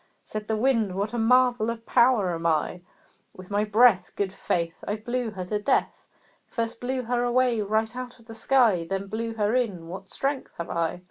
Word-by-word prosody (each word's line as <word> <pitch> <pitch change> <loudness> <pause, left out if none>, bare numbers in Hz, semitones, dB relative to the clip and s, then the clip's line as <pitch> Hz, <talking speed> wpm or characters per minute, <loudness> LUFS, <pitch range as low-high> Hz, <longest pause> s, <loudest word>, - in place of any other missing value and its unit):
Said 215 0 -6
the 220 - 0
Wind 225 -5 +1
"What 205 +3 -2
a 240 - -1
marvel 245 -1 +3
of 230 0 -5
power 235 -7 +3
am 165 0 -2
I! 160 +2 0 0.6
With 185 +1 -11
my 205 +1 +2
breath, 215 -3 +4
Good 195 -2 -2
faith! 170 -2 -2
I 205 - 0
blew 240 +2 -3
her 190 -4 -6
to 210 +3 -2
death - - 0 0.4
First 230 -1 -3
blew 255 +1 -2
her 240 +1 0
away 245 -2 +2
right 220 +3 0
out 250 -1 -6
of 230 - -20
the 225 - -10
sky 225 -6 +3
Then 195 0 -2
blew 225 +3 -4
her 210 0 +1
in; 205 -10 -1
what 190 +1 -8
strength 275 0 -3
have 170 - -5
I!" 165 +1 -1
220 Hz, 200 wpm, -26 LUFS, 195-245 Hz, 0.6 s, breath